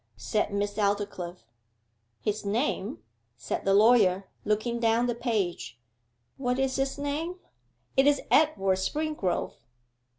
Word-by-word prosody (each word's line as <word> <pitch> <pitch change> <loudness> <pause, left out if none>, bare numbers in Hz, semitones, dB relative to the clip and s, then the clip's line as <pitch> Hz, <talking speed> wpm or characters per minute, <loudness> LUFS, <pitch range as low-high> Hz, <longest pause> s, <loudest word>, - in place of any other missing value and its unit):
said 115 - -1
Miss 205 +1 -2
Aldclyffe. 200 -3 -2 0.8
'His 210 0 -2
name 200 - -1 0.2
' 115 - -46
said - - -4
the 195 - +3
lawyer, 200 -4 +5 0.2
looking 215 +3 0
down 230 +1 +2
the 245 - 0
page; 195 - -2 0.6
'what 250 -1 -1
is 270 -1 0
his 270 +1 -1
name? 295 +5 -2 0.6
it 270 +1 +5
is 290 -1 +4
Edward 195 -12 +3
Springrove. 300 - -1
215 Hz, 125 wpm, -28 LUFS, 195-270 Hz, 0.8 s, lawyer